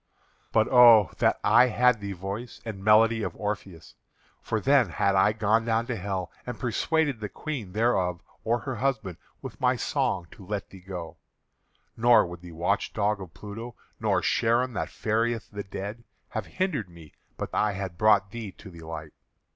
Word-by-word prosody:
But 110 -1 +3
oh! 120 -5 +7
that - - +2
I 125 - +6
had 125 0 +3
the 100 -1 -5
voice 100 +6 -6
and 100 -4 -6
melody 110 +2 +5
of - - -3
Orpheus, 95 -7 -5 0.5
for 110 - -1
then 135 -2 +3
had 100 +3 +1
I 95 +2 +5
gone 110 +1 +1
down 115 0 0
to 120 - -3
Hell 95 -3 -4
and 125 -1 -6
persuaded 140 +2 0
the 105 -1 -5
Queen 115 - -6
thereof 95 -6 +1 0.2
or 115 +1 0
her 130 -4 -4
husband 110 -8 -1 0.3
with - - -8
my - - +3
song 90 -3 -1
to - - -13
let 105 +1 -5
thee 95 - -12
go; 90 -3 -7 0.8
nor 120 +1 +5
would 85 -1 -9
the 90 -1 -11
watch 90 +5 -1
dog 105 -1 0
of 85 -4 -10
Pluto, 110 +7 -8 0.2
nor - - +1
Charon 120 +2 +1
that - - -3
ferrieth 115 +1 -1
the 100 0 -5
dead, 100 +4 -7 0.3
have 110 -2 -4
hindered 165 - -2
me 85 -3 -15 0.2
but - - -5
that - - +1
I 105 -1 +1
had 95 -3 -6
brought 100 -2 +4
thee 110 -3 -6
to 95 +1 -13
the 85 -1 -12
light. 80 -1 -8
105 Hz, 180 wpm, -27 LUFS, 95-115 Hz, 0.8 s, oh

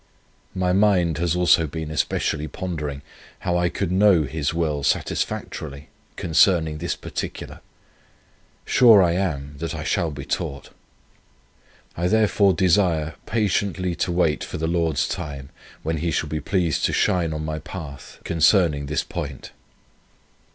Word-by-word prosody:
My 90 -1 +1
mind 90 -5 +3
has 85 0 +1
also 90 -2 +4
been 80 +1 -5
especially 75 0 -1
pondering, 75 -6 -5 0.4
how 90 -1 -1
I 90 0 +2
could 90 0 -3
know 95 -3 +5
His 70 0 -2
will 80 -3 -1
satisfactorily 70 0 -2 0.3
concerning 80 -1 +2
this 85 0 -2
particular. - - -6 1.1
Sure 115 -6 +6
I 85 - +3
am, 75 -6 -2
that 85 +1 -4
I 80 - -5
shall 80 +1 0
be 70 -2 -7
taught. 70 -2 -4 1.2
I 85 +1 0
therefore 100 -2 +3
desire 85 -3 +2
patiently 100 -4 0
to - - -1
wait 85 -3 +1
for - - -6
the 80 - -2
Lord's 80 -2 0
time, 70 -5 -6 0.3
when 80 +1 -1
He 85 +3 -1
shall 80 -1 -1
be 80 - -2
pleased 85 -1 0
to - - 0
shine 85 -3 +1
on 75 0 -4
my 80 0 -3
path 75 -7 -9
concerning 80 -3 +3
this 75 +3 -1
point. 75 -7 -6
85 Hz, 140 wpm, -23 LUFS, 75-90 Hz, 1.2 s, Sure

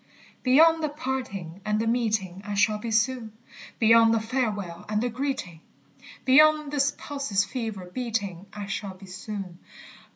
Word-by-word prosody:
Beyond 320 +5 +5
the 305 - +1
parting 255 - -5
and 210 +1 0
the 225 - 0
meeting 215 -6 0
I 205 0 -4
shall 210 +1 +2
be 230 - -5
soon; 225 0 0 0.4
Beyond 225 0 +6
the - - +2
farewell 215 -7 -2
and 210 0 +1
the 245 +2 0
greeting, 245 - -4 0.6
Beyond 305 +2 +5
this 285 -1 +2
pulse's 275 -9 -1
fever 220 -7 -5
beating, 200 -3 -4
I 210 -1 -6
shall 195 -1 -4
be 190 +1 -13
soon. 190 -1 -7
220 Hz, 150 wpm, -26 LUFS, 200-260 Hz, 0.6 s, Beyond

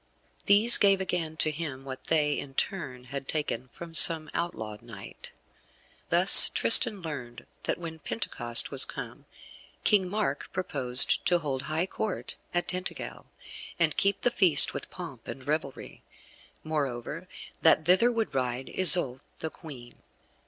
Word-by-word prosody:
These 210 +4 +6
gave 195 -1 +2
again 170 -4 -5
to 155 - -1
him 145 -4 -8
what 130 -1 -10
they, 150 -2 -1
in 135 -1 -11
turn, 140 -11 -5
had 140 -1 -7
taken 150 -4 -4
from 165 +7 -13
some 160 -1 +4
outlawed 110 -11 -6
knight. 115 -4 -13 0.8
Thus - - +9
Tristan 185 - +3
learned 125 -7 -9 0.2
that - - -3
when 165 -2 -10
Pentecost 120 -2 0
was - - +5
come - - -5 0.6
King 190 -3 +1
Mark 200 -8 -4
purposed 135 -9 +3
to 175 - +2
hold 140 -6 -5
high 160 +3 -2
Court 205 +1 -6 0.2
at 175 0 -3
Tintagel, 180 +1 -6 0.5
and 165 -3 -1
keep 200 0 0
the 245 - 0
feast 180 -10 +4
with - - -8
pomp 140 -10 -12
and 130 0 -10
revelry; 150 -2 -6 0.6
moreover 150 +2 -6 0.3
that 160 -1 +2
thither 185 +8 +3
would 225 -6 -4
ride 130 0 -4
Isoude, 175 -8 +2 0.2
the 160 - -7
Queen. 130 -7 -13
155 Hz, 140 wpm, -26 LUFS, 130-180 Hz, 0.8 s, Thus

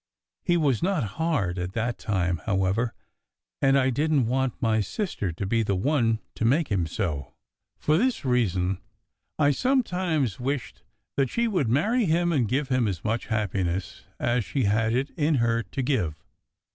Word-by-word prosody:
He 175 -1 +2
was 140 -8 +2
not 180 -5 +1 0.2
hard 100 - 0
at 90 +1 -4
that 115 +1 -2
time, 90 -4 0
however, 100 +3 +1 0.7
and 135 0 +4
I 130 -1 +3
didn 150 +1 +2
t 115 - -2
want 130 0 0
my 110 -3 +2
sister 105 - -3
to 95 - -4
be 115 +4 +1
the 100 -3 0
one 115 +1 +2 0.2
to - - -4
make 140 +8 +2
him 90 -5 +1
so. 80 -6 -3 0.4
For 155 +2 +2
this 255 - 0
reason, 95 -7 +1 0.6
I 145 -1 +4
sometimes 180 - 0
wished 125 -1 -3 0.4
that 135 -2 +2
she 235 0 +1
would 180 - 0
marry 215 - +2
him, 175 +1 +2
and 130 -8 +2
give 135 +5 -1
him 130 -3 +2
as 90 -6 -3
much 115 +2 -1
happiness 95 -3 -2
as 120 0 +1
she 135 +5 -1
had 110 +2 +2
it 130 +4 0
in 155 0 +2
her 115 -2 +2
to 110 +5 -4
give. 95 - -1
120 Hz, 170 wpm, -26 LUFS, 100-150 Hz, 0.7 s, and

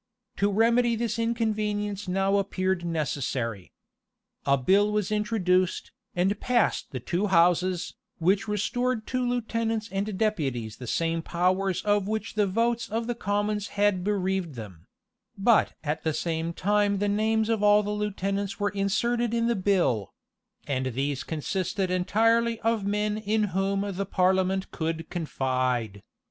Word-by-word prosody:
To 200 +1 +2
remedy 235 +3 +3
this 230 0 -2
inconvenience 210 -3 -1
now 195 +2 +2
appeared 190 -2 -1
necessary. 135 - -2 0.8
A 140 0 +4
bill 195 +10 +3
was 210 -1 -1
introduced, 190 -4 +1 0.2
and 190 +4 +1
passed 245 -3 +1
the 130 - -5
two 175 - -1
houses, 180 0 +2 0.2
which 190 +6 +1
restored 220 +3 -1
to 255 - -2
lieutenants 230 -2 -1
and 195 +1 -2
deputies 135 - -1
the 125 - -8
same 165 +5 0
powers 185 +3 0
of 205 -1 +2
which 220 +1 -3
the 210 -2 +2
votes 230 +4 0
of 225 +2 -2
the 240 - -1
commons 205 -1 -1
had 200 -3 +2
bereaved 190 -5 -1
them; 100 -8 -10 0.5
but 215 +3 +3
at 150 0 -2
the 160 - 0
same 165 0 -2
time 205 +3 +1
the 205 +1 0
names 220 +2 +1
of 225 -2 0
all 210 0 +5
the 205 - -3
lieutenants 200 -1 -2
were 205 0 +1
inserted 235 +4 0
in 230 0 +1
the 235 0 +2
bill; 180 - +1 0.5
and 130 -2 -1
these 140 0 -1
consisted 185 +4 -2
entirely 225 +5 +2
of 225 -3 0
men 210 +1 0
in 215 0 0
whom 195 +1 0
the 200 -1 -3
parliament 190 0 +1
could 165 0 -3
confide. 130 - -1
200 Hz, 145 wpm, -27 LUFS, 175-215 Hz, 0.8 s, all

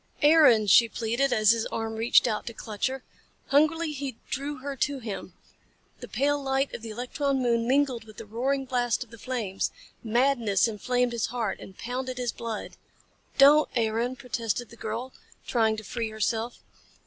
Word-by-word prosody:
"Aaron!" 290 -8 +6
she 230 +4 +6
pleaded 235 +5 0
as 215 -3 +5
his 230 -1 0
arm 225 0 -3
reached 225 +2 +4
out 215 -2 -2
to 235 - -5
clutch 215 0 -2
her. 265 0 -5 0.5
Hungrily 310 +3 +3
he 275 -4 -5
drew 285 +2 -2
her 275 +1 -5
to 285 +2 0
him. 225 -6 -6 0.7
The - - -8
pale 290 +1 0
light 270 0 0
of - - -6
the 225 - -7
electron 265 +5 -1
moon 235 -2 +1
mingled 260 -3 +1
with 215 -1 -15
the 225 - -8
roaring 265 +6 -1
blast 245 -2 0
of 235 - -22
the 230 - -12
flames. 215 -6 -2 0.3
Madness 235 -3 +2
inflamed 245 +3 0
his 235 -2 -1
heart 230 -4 -3
and 190 - -12
pounded 255 +1 -4
his 245 -2 -1
blood. 230 -2 -6 0.6
"Don't, 290 +2 +7
Aaron," 230 +2 0
protested 235 -2 -3
the - - -11
girl, 230 +4 -5 0.3
trying 220 -2 +1
to 220 - -7
free 230 +2 -3
herself. 220 +2 -2
240 Hz, 170 wpm, -27 LUFS, 225-270 Hz, 0.7 s, Don't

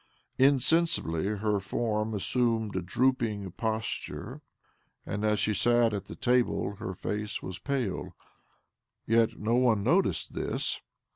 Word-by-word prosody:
Insensibly 135 - +3
her 105 0 0
form 105 +2 -1
assumed 110 0 0
a 95 - 0
drooping 110 -1 0
posture, 110 - -3 0.6
and 105 +1 -3
as 105 0 +2
she 105 +1 +1
sat 120 +1 +3
at 100 - -3
the - - -9
table 120 -4 +1
her 100 -4 -5
face 105 +3 -4
was 90 -2 -5
pale. 125 -5 -3 0.9
Yet 115 0 +2
no 110 +2 -1
one 120 -5 +3
noticed 175 - +1
this. - - -1
110 Hz, 125 wpm, -29 LUFS, 100-125 Hz, 0.9 s, Insensibly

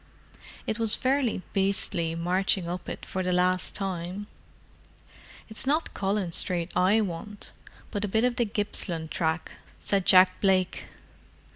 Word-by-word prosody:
It 220 - -2
was 225 -2 +3
fairly 255 -7 0
beastly 190 -4 0
marching 180 +2 0
up 175 +1 -5
it - - -7
for 190 - -3
the 180 0 -1
last 180 0 +1
time." 190 0 -4 1.2
"It's 220 +4 +1
not 310 +4 +1
Collins 195 -3 0
Street 175 -1 0
I 190 +5 +4
want, 205 +2 -6 0.4
but 205 -1 -2
a - - 0
bit 220 +3 +1
of 250 -1 +1
the 240 - +2
Gippsland 185 -6 -1
track," 160 0 -1 0.3
said 195 -2 0
Jack 185 0 +6
Blake. 190 -2 +1
190 Hz, 140 wpm, -27 LUFS, 180-210 Hz, 1.2 s, Jack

